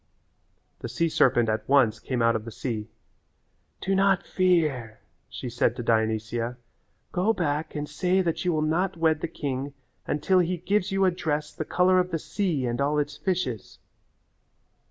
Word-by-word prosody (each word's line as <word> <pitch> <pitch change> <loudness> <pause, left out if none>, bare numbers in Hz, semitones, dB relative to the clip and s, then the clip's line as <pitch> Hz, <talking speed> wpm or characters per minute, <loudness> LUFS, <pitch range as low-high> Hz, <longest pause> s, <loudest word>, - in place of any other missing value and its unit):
The 120 - -6
sea 165 +8 0
serpent 120 -6 +3
at 110 +1 -2
once 125 -6 +4
came 125 -3 -2
out 115 0 +4
of 110 - -2
the 115 - -7
sea. 110 -2 -4 0.9
"Do 195 - 0
not 195 0 +3
fear," 155 - +1 0.3
she - - -6
said 120 0 +1
to 120 - -5
Dionysia. 115 +1 0 0.5
"Go 190 +5 +2
back 155 -5 -2
and 150 0 -3
say 185 +5 +1
that 165 -2 -1
you 180 - +1
will 155 -2 0
not 170 +4 0
wed 160 -2 +2
the - - -1
king 140 -3 -4 0.3
until 185 +6 +2
he 180 +1 +1
gives 195 +3 0
you 195 0 +2
a 185 - +4
dress 150 -4 -2
the 155 - -4
colour 185 +3 +3
of 180 0 0
the 165 - -1
sea 165 -5 -1
and 120 +2 -1
all 145 +2 +1
its 150 - -1
fishes." 175 - -3
150 Hz, 175 wpm, -26 LUFS, 120-180 Hz, 0.9 s, once